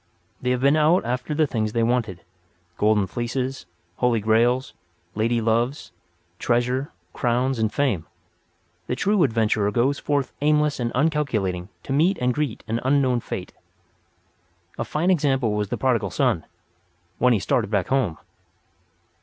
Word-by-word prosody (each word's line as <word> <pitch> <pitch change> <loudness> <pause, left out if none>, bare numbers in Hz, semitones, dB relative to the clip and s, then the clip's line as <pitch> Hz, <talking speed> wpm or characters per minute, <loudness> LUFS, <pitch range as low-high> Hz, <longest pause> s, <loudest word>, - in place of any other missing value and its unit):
They 125 - -1
have 125 0 0
been 140 +2 +4
out 155 +2 +3
after 125 +5 -2
the 155 0 +3
things 110 -6 -2
they 115 -1 +1
wanted—golden 95 -3 -2
fleeces, 120 +1 -4 0.3
holy 125 -2 +2
grails, 120 +4 +2 0.4
lady 115 +2 +1
loves, 115 - 0 0.5
treasure, 125 +3 0 0.2
crowns 125 +1 0
and 110 -1 +1
fame. 105 - 0 0.8
The 125 - -1
true 205 +6 +1
adventurer 110 -6 +2
goes 125 +7 +1
forth 140 -2 -1
aimless 150 -1 +2
and 120 -1 -1
uncalculating 115 - 0
to 135 - -4
meet 170 +7 +3
and 125 0 +1
greet 145 -5 -3
unknown 130 +2 +1
fate. 95 -5 -6 1.3
A - - 0
fine 170 +5 0
example 135 - +1
was 105 -1 -1
the - - -2
Prodigal 115 -6 +1
Son—when 85 +7 -2
he - - +3
started 110 +2 0
back 100 -4 0
home. 125 - +1
120 Hz, 135 wpm, -23 LUFS, 105-135 Hz, 1.3 s, been